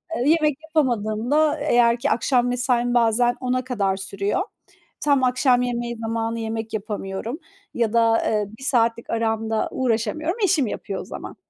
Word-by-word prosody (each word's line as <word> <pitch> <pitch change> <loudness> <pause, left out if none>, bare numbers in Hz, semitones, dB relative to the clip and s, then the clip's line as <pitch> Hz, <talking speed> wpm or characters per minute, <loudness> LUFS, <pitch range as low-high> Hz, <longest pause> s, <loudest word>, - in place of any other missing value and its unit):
Eee, 250 +4 +1
yemek 305 -3 +3
yapamadığımda, 270 -1 +1
eğer 240 -5 +3
ki - - 0
akşam 245 +1 +2
mesaim 245 -1 0
bazen 240 +1 +3
22.00'a 255 0 -1
kadar 200 -7 -1
sürüyor. 200 - -2 0.6
Tam 280 -3 +2
akşam 250 0 +3
yemeği 240 -1 -2
zamanı 225 0 -2
yemek 225 0 -4
yapamıyorum 210 - -4 0.3
ya 230 -2 0
da, 230 -1 +4
eee, 210 -1 +1
1 - - -10
saatlik 230 -3 +1
aramda 225 -1 -1
uğraşamıyorum. 260 - -1
Eşim 320 -9 +2
yapıyor 195 -2 -5
o - - -9
zaman. - - -8
235 Hz, 145 wpm, -23 LUFS, 225-255 Hz, 0.6 s, da